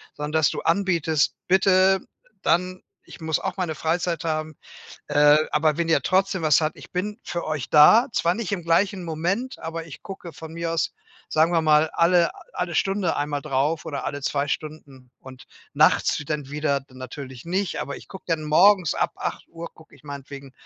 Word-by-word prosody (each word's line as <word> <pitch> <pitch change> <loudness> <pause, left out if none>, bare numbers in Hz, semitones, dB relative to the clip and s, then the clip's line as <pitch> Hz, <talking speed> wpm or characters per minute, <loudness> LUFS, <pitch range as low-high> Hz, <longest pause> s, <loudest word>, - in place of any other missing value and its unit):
Sondern 150 +1 -5
dass 160 -2 +3
du - - -4
anbietest: 165 -4 +1
„Bitte 190 0 +4 0.4
dann 180 +2 +1 0.3
ich - - -12
muss 160 -1 0
auch - - -4
meine 180 -4 -2
Freizeit 170 +1 -1
haben, 155 -1 -2 0.5
äh, 145 0 +5 0.2
aber 150 0 +2
wenn 170 - 0
ihr 165 - +3
trotzdem 190 -1 +1
was 155 -1 +4
habt, 155 0 -2
ich - - -14
bin 205 +4 -3
für 170 - -4
euch 155 -4 -3
da. 215 - +7
Zwar 170 +1 +1
nicht 215 -4 -4
im 180 -4 -2
gleichen 185 +3 +1
Moment, 175 +11 -2
aber 165 0 -5
ich 160 - -11
gucke 185 -3 -8
von 160 0 -10
mir 170 0 -3
aus, 165 - -1 0.3
sagen 160 +2 +3
wir 165 - +3
mal, 155 0 +4
alle 170 0 +3
a - - -14
alle 175 -1 -3
Stunde 195 -2 0
einmal 145 -1 -2
drauf 150 +3 -1
oder 145 -3 -4
alle 145 0 -4
2 140 +1 -1
Stunden 140 -4 -6
und 130 -1 -13 0.3
nachts - - +3
w - - -7
dann 150 -2 -4
wieder 145 -2 -1
natürlich 130 0 -9
nicht. 185 +2 -2
Aber - - -5
ich - - -13
gucke 190 - -11
dann 160 -2 -1
morgens 180 +2 +4
ab - - 0
8:00 170 0 -6
gucke 160 - -18
ich - - -24
meinetwegen 140 -1 -9
160 Hz, 190 wpm, -24 LUFS, 150-180 Hz, 0.5 s, da